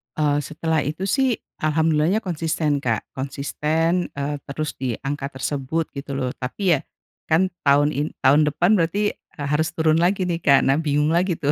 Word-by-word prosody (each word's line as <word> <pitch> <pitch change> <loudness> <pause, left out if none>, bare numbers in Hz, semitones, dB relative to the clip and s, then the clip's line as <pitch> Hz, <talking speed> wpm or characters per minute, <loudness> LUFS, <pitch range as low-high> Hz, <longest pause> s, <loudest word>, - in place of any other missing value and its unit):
Eee, 145 -1 +2
setelah 155 +2 -1
itu 155 +6 -3
sih 260 +3 +2 0.3
alhamdulillahnya 160 +5 +2
konsisten 160 -4 -1
Kak 115 -5 -1
konsisten, 155 +6 -1
eee, 145 +1 -2
terus 150 +2 -3
di 125 -4 -1
angka 140 0 -3
tersebut 145 +4 -2
gitu 140 0 -5
loh 130 -2 -1
tapi 165 +6 +1
ya, - - -6 0.5
kan 180 +4 +2 0.2
tahun 145 +1 +5
in 145 +2 -1 0.2
tahun 145 +3 +5
depan 175 +7 +2
berarti, 200 +5 +1
eee, 145 -2 -9
harus 155 +2 +2
turun 160 0 +3
lagi 185 +2 +2
nih 170 -1 -1
Kak 140 -2 +5
nah 135 +2 +3
bingung 150 0 +1
lagi 175 +1 +2
tuh 145 0 +1
155 Hz, 170 wpm, -22 LUFS, 140-165 Hz, 0.5 s, tahun